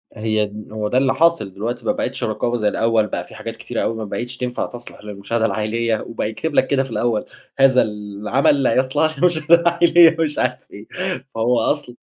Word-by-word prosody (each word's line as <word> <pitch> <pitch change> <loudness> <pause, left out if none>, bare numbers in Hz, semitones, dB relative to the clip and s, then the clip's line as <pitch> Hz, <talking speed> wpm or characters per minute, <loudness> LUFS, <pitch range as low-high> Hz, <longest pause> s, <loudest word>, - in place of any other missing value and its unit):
هي 110 -1 0
د 105 +1 -10
هو 105 -1 -2
ده 125 - 0
اللي 130 0 +3
حاصل 165 - +2
دلوقتي 115 +5 -4
ما - - +2
بقيتش 275 +1 -3
رقابة 115 +3 -1
زي 105 -2 0
الأوّل، 110 0 +1
بقى - - -4
في - - -15
حاجات - - -6
كتيرة - - -4
أوي 115 - -1
ما 110 -1 -5
بقيتش 120 +4 -5
تنفع 125 0 -2
تصلح 120 -3 -10
للمشاهدة 105 +2 -2
العائلية، 110 +2 -1
وبقى 115 -2 -3
يكتب 150 +8 -4
لك - - +3
كده 135 -1 +1
في 135 - -10
الأوّل 115 -2 0 0.3
"هذا 135 -1 +6
العمل 105 +7 0
لا 115 - +2
يصلح 145 +4 +1
للمشاهدة 170 -1 +4
العائلية" 170 -1 +5
مش 155 -2 0
عارف - - -2
إيه، - - -11 0.5
فهو 115 +2 +2
أصل 125 0 -2
120 Hz, 200 wpm, -20 LUFS, 110-145 Hz, 0.5 s, هذا